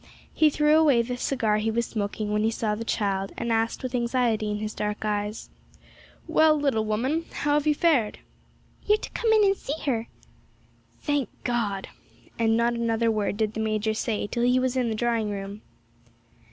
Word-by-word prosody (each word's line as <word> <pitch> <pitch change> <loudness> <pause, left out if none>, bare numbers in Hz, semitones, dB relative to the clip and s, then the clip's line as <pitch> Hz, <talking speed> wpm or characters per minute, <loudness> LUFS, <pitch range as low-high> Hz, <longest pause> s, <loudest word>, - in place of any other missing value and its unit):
He 310 - +4
threw 300 +1 +4
away 280 -7 +4
the 250 +1 -4
cigar 235 -4 0
he 215 +1 0
was 235 +1 0
smoking 210 -1 -3
when 210 - +1
he 220 - +2
saw 220 -1 -1
the 215 +2 -4
child, 195 -3 -1
and 235 - -2
asked, 225 +2 0
with 255 -1 -4
anxiety 235 -3 0
in 210 - -1
his 215 0 -4
dark 210 +1 -3
eyes, 210 +1 -3 0.7
'Well, 315 -1 +4
little 265 -7 +1
woman, 260 +10 -1
how 290 0 -1
have 295 +1 +1
you 300 - +4
fared?' 280 -11 +2 0.7
'You're 420 +1 +3
to - - -8
come 455 - 0
in 435 -1 +5
and 390 -1 +4
see 310 -4 -5
her.' 235 -5 -1 1.0
'Thank 290 -6 0
God!' 210 -6 -1 0.5
and 225 -1 +3
not 235 +1 +2
another 230 -1 +1
word 210 -2 -1
did 215 -1 0
the 220 - -5
major 220 0 0
say 215 -1 -2
till 235 +4 -3
he 250 +1 +3
was 255 0 0
in 250 -2 +1
the 220 - -1
drawing 230 -1 0
room. 200 +1 -6
230 Hz, 190 wpm, -26 LUFS, 215-260 Hz, 1.0 s, in